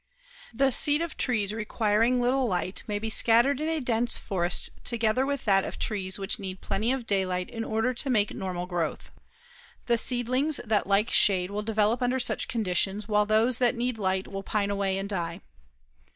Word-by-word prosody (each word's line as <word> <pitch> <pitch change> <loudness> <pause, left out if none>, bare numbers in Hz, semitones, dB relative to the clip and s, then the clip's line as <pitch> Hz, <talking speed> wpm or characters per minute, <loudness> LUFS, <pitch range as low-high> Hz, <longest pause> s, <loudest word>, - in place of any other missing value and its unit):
The 265 +3 +1
seed 295 +6 +4
of 335 - -6
trees 215 -5 0
requiring 225 +2 +1
little 250 +1 +1
light 185 0 -2
may 210 -1 -2
be 220 +1 -3
scattered 240 +6 +4
in 310 - -1
a 325 -1 0
dense 240 -3 0
forest 175 -2 -2
together 235 +2 +1
with 280 -1 -3
that 195 -2 +3
of - - -6
trees 190 -3 -2
which 200 +2 -2
need 190 -2 -6
plenty 220 +5 -1
of 260 -3 -2
daylight 185 -3 -1
in 225 -1 -4
order 225 +3 -1
to 265 +3 0
make 215 -5 +1
normal 180 -2 -4
growth. 165 - -4 0.7
The 235 -1 +2
seedlings 255 +5 +1
that 215 -3 0
like 200 +3 +2
shade 185 -2 +3
will 205 +1 -3
develop 220 +2 0
under 250 +1 +1
such 250 - 0
conditions 205 -1 -1
while 210 -1 +2
those 225 +3 +2
that 245 -2 +2
need 240 -1 -2
light 190 -1 -1
will 195 0 -6
pine 205 0 -1
away 195 -1 -1
and 195 +1 -3
die. 170 -4 -4
215 Hz, 185 wpm, -27 LUFS, 195-245 Hz, 0.7 s, seed